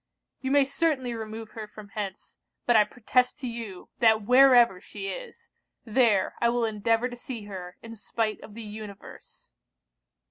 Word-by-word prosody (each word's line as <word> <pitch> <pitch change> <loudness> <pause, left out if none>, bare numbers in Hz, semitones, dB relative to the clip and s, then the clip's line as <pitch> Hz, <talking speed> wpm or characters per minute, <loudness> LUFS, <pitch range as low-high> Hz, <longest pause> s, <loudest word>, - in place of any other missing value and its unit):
You 265 - -3
may 280 0 +5
certainly 275 -3 0
remove 220 -1 -7
her 220 -2 -7
from 210 -1 -12
hence; 200 -1 -6 0.3
but 240 - +4
I 210 -1 +7
protest 250 +3 +1
to 255 - -3
you, 230 -6 -7
that 220 -2 +4
wherever 245 -5 +6
she 195 -1 -7
is, - - -8 0.4
there 220 -4 +3
I 235 - +4
will 240 -1 +1
endeavour 225 +2 +1
to 245 - -8
see 240 -2 -7
her, 185 -3 -8
in 230 0 -8
spite 220 0 -2
of 210 - -12
the 230 - -7
universe.' 210 -1 -11
225 Hz, 165 wpm, -27 LUFS, 210-245 Hz, 0.4 s, I